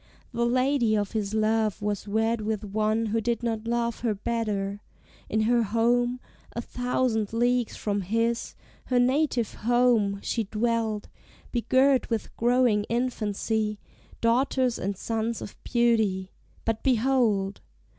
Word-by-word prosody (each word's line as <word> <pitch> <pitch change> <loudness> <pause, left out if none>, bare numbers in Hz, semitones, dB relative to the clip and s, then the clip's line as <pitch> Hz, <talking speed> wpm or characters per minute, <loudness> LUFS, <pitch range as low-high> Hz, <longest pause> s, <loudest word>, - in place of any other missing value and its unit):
The 235 0 +1
lady 255 -3 +2
of 205 -1 -1
his 215 -1 -2
love 220 -1 +1
was 205 -1 -3
wed 220 +2 +1
with 215 0 -2
one 215 +2 0
Who 225 +1 0
did 235 +2 -1
not 225 -1 -2
love 235 -1 -1
her 225 -3 0
better: 205 -2 -2 0.5
in 220 - +1
her 235 +2 +3
home, 240 +3 +1 0.3
A - - -3
thousand 245 -4 -1
leagues 245 0 +1
from 205 -1 -1
his, 230 +5 -1 0.3
her 250 - +1
native 255 -2 +1
home, 235 -4 +2
She 225 -2 -1
dwelt, 220 0 -1 0.4
begirt 260 +3 +3
with 225 -3 -3
growing 240 -3 +3
infancy, 220 -3 -1 0.4
Daughters 250 +1 +2
and 195 0 -2
sons 225 +1 -2
of - - -8
beauty, 220 -6 +1 0.3
but 225 -1 -1
behold! 230 -6 +1
225 Hz, 130 wpm, -26 LUFS, 215-240 Hz, 0.5 s, her